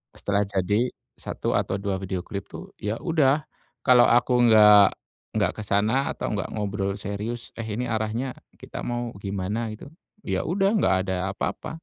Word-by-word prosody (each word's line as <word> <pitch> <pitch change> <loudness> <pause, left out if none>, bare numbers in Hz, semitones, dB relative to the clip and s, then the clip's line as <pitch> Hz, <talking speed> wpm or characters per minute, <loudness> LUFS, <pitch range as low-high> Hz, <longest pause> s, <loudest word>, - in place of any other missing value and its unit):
Setelah 100 0 0
jadi, 105 +5 +1 0.3
1 - - -3
atau - - -1
2 100 -2 -1
video 95 -1 -3
klip 100 -2 -6
tuh, - - -9
ya 105 +2 -1
udah, 150 -3 +2 0.4
kalau 125 -2 +7
aku 120 +2 +3
nggak, 105 -3 +7 0.4
nggak - - +2
ke 110 - -5
sana, 110 +7 +2
atau - - -3
nggak 100 -3 -3
ngobrol 100 -2 -2
serius, 105 +4 -5
"Eh 115 - -3
ini 110 +4 -2
arahnya, 110 +4 -2 0.3
kita - - -7
mau 120 0 -2
gimana?" 100 +3 -3
Gitu, 110 - -11 0.4
ya - - -1
udah, 195 +4 +2
nggak 95 - +3
ada 95 -1 -1 0.2
apa-apa. 155 - -4
110 Hz, 160 wpm, -25 LUFS, 100-120 Hz, 0.4 s, kalau